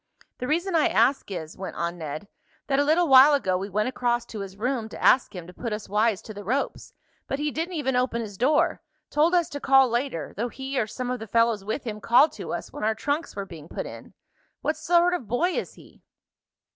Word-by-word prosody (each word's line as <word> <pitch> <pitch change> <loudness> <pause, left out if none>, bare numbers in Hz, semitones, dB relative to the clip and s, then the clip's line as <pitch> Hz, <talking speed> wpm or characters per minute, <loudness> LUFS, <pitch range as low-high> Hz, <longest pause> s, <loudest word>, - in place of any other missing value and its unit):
"The 250 - -3
reason 345 +6 0
I 315 - +4
ask 275 -4 +2
is," 165 -5 -6
went 190 - -6
on 170 +1 -3
Ned, 155 +4 -6 0.4
"that 275 -1 +1
a - - +4
little 325 +4 +3
while 270 +2 +8
ago 190 -10 0
we 195 +2 -3
went 210 +3 0
across 240 -2 0
to 215 - -8
his 195 -1 -7
room 235 0 -2
to - - -9
ask 250 - +4
him 175 -2 -7
to 180 - -12
put 235 +4 -5
us 210 0 -4
wise 215 +1 +1
to 215 - -8
the 205 0 -8
ropes, 255 +8 -2 0.4
but 270 - -2
he 295 +1 -1
didn't 335 +4 -3
even 265 -4 -1
open 250 -1 +1
his 215 -3 -6
door. 275 +9 +2 0.3
Told 320 +4 +3
us 345 -2 +3
to 285 - -6
call 270 -1 +5
later, 240 - -2
though 235 +4 -2
he, 265 +2 -4
or 215 - 0
some 250 +3 -4
of 250 - -3
the 225 - -7
fellows 230 -1 +2
with 220 +7 -3
him 215 -3 -5
called 245 +8 +5
to - - -7
us - - -5
when - - -6
our 220 +1 +1
trunks 290 +8 -2
were 200 -1 -4
being 160 -5 -11
put - - -4
in. - - -10 0.5
What 310 - 0
sort 345 +3 +3
of 305 -11 -3
boy 285 - +1
is - - -4
he?" - - -18
245 Hz, 235 wpm, -25 LUFS, 210-285 Hz, 0.5 s, while